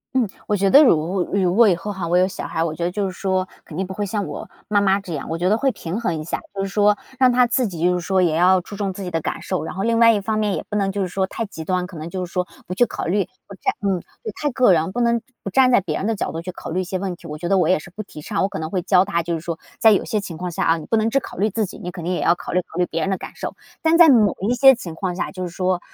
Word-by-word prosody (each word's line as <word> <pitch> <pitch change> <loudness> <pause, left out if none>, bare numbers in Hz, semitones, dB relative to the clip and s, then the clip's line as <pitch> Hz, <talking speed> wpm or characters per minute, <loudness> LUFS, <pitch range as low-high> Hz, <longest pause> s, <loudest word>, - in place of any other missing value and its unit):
嗯， 250 -4 +3 0.2
我 210 - +2
觉 195 -1 +2
得 285 +3 +9
如 180 - +2
如 185 -3 +2
果 225 +1 +6
以 180 - +3
后 195 +5 -5
哈 185 -3 -4
我 175 +2 +2
有 185 +1 +4
小 190 - -6
孩 - - -4
哈， - - +2
我 160 - -2
觉 170 - -4
得 175 - +1
就 200 +2 -1
是 190 - -2
说 185 0 -1 0.2
肯 155 - -10
定 190 - -1
不 190 - -7
会 205 +1 -3
像 205 0 -2
我 - - -7 0.2
妈 205 -1 +2
妈 195 0 +3
这 190 -4 -7
样。 145 - -5
我 165 - -2
觉 175 +2 0
得 210 - +4
会 270 +4 +1
平 180 -2 -5
衡 175 -9 -1
一 - - -5
下， 160 - -3 0.2
就 195 - -1
是 - - -2
说 205 +1 +3 0.2
让 255 -1 +6
他 250 0 +4
自 245 0 +1
己 170 -4 -5
就 180 +1 +4
是 180 - 0
说 190 +2 0
也 170 -4 +2
要 185 +3 +5
注 185 +3 -9
重 200 -1 -2
自 195 +1 -7
己 180 - -5
的 165 -1 -1
感 - - -3
受， 185 - -2
然 160 - -6
后 195 - -2
另 230 +1 +2
外 230 0 +7
一 215 - +1
方 215 +2 -1
面 210 -2 0
也 - - -5
不 210 - -5
能 195 -2 +1
就 200 0 -1
是 - - -2
说 190 +1 -1
太 230 - -4
极 165 -5 -8
端， 180 +1 -1
可 180 -1 -11
能 155 +1 -6
就 185 +1 -3
是 175 - -14
说 180 -1 -1 0.2
不 180 - -5
去 240 +6 +3
考 - - -5
虑 195 +3 +1 0.2
不 - - -10
太 - - -1 0.2
嗯， 190 -2 +1 0.2
对， 220 - -4
太 295 - +1
个 245 -6 +4
人， 165 +1 +1
不 240 - -3
能 235 -1 +2 0.2
不 195 - -4
站 260 +5 +5
在 245 - +5
别 170 -6 -3
人 195 - -2
的 225 - 0
角 - - -3
度 165 - -5
去 185 +2 -6
考 - - -8
虑 185 +3 0
一 - - -2
些 185 +1 -3
问 185 -1 -3
题， 170 - -13
我 150 -1 -6
觉 170 +3 -4
得 195 +1 +3
我 - - +2
也 185 - +4
是 155 +4 -11
不 210 - -6
提 195 -7 -11
倡。 200 +7 -2
我 195 - +1
可 - - -5
能 160 +1 -4
会 185 - 0
教 185 +1 +4
他 170 - 0
就 170 0 -2
是 160 - -5
说 165 0 -5 0.2
在 220 - +6
有 200 - +3
些 215 - -1
情 190 -5 -7
况 180 +2 -4
下 170 - -2
啊， 165 - +3
你 160 - -9
不 225 - +2
能 220 0 +2
只 275 - +3
考 - - -10
虑 205 +4 +1
自 215 0 -1
己， - - -10
你 180 - -6
肯 175 -2 -8
定 175 - -2
也 180 - -1
要 170 - +5
考 175 - -7
虑 180 - +2
考 165 - -11
虑 180 - +2
别 165 - -3
人 195 - 0
的 190 - 0
感 - - -8
受。 - - -5 0.3
但 325 0 +4
在 335 -1 +8
某 220 -8 +5
一 220 +6 +1
些 270 +1 +8
情 175 -10 -7
况 180 +1 -3
下， - - -2
就 185 -1 -6
是 180 - -3
说， 185 0 0
190 Hz, 380 characters per minute, -21 LUFS, 175-210 Hz, 0.3 s, 得